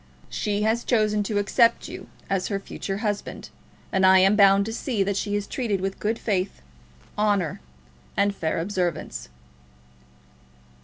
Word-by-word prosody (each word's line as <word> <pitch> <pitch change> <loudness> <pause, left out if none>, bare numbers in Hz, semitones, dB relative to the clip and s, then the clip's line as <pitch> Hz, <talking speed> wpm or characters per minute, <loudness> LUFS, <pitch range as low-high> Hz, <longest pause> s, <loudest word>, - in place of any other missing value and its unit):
She 210 -1 -1
has 225 +2 +1
chosen 215 -3 +2
to 210 - 0
accept 230 +3 +3
you - - -9 0.2
as 195 -2 0
her 200 -2 -2
future 195 0 -5
husband, 205 -1 -3 0.4
and 190 -1 +1
I 190 0 +7
am 195 +2 +5
bound 200 -1 +6
to 225 - -4
see 225 -4 -1
that 200 +1 -1
she 205 +1 -1
is 205 -1 -1
treated 220 -6 -2
with 195 +1 -3
good 220 +2 -1
faith, 190 - -2 0.6
honour, 200 - +1 0.6
and 200 0 +3
fair 160 -4 -1
observance." 175 - -3
200 Hz, 150 wpm, -25 LUFS, 190-210 Hz, 0.6 s, I